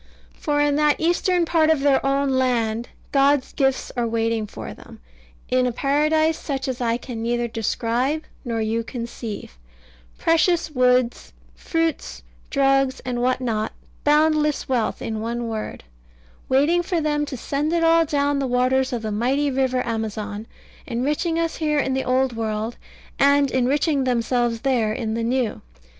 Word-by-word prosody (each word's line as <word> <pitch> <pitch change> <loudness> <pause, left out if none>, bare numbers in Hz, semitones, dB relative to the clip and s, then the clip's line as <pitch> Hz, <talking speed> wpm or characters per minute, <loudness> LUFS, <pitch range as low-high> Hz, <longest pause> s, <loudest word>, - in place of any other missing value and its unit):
For 290 -1 -1
in 290 0 +2
that 300 -1 +3
eastern 350 +1 +2
part 320 -1 +3
of 315 -3 +3
their 280 -1 +3
own 275 +1 +1
land 240 -3 0 0.2
God's 275 -1 +3
gifts 270 -2 0
are 240 -2 0
waiting 225 -1 0
for - - -8
them, - - -14 0.5
in 255 0 +2
a - - 0
paradise 305 +5 +1
such 270 -3 -3
as 255 -1 -3
I 230 -1 +1
can 245 -2 -7
neither 240 +1 0
describe 235 +6 -1 0.2
nor 230 -3 -2
you 225 +1 -1
conceive; 230 - -7 0.6
precious 330 0 +2
woods, 250 -2 +1 0.2
fruits, 325 - -2 0.3
drugs, 270 -1 +2
and 245 -1 -3
what 255 +1 +1
not 220 -3 -1 0.3
boundless 300 0 +2
wealth, 245 -4 -1
in 220 -1 -3
one 235 +1 -3
word 220 -1 -5 0.7
waiting 290 +7 +3
for 350 -1 -1
them 300 -1 0
to 265 - -5
send 290 +6 -2
it 335 -1 +1
all 330 0 +5
down 285 -2 0
the 270 - -1
waters 255 +1 +2
of 240 -2 -3
the 215 - -2
mighty 265 +7 +1
river 255 -1 0
Amazon, 215 -2 -4 0.4
enriching 295 +7 -1
us 330 -1 -1
here 300 -2 0
in 270 -2 +1
the 265 0 0
Old 255 -1 +1
World, 220 +1 -2 0.4
and 280 -1 +4
enriching 275 +2 +1
themselves 240 -1 0
there 245 -6 +1
in 220 -1 -3
the 230 - -2
New. 240 0 -1
260 Hz, 155 wpm, -22 LUFS, 230-290 Hz, 0.7 s, all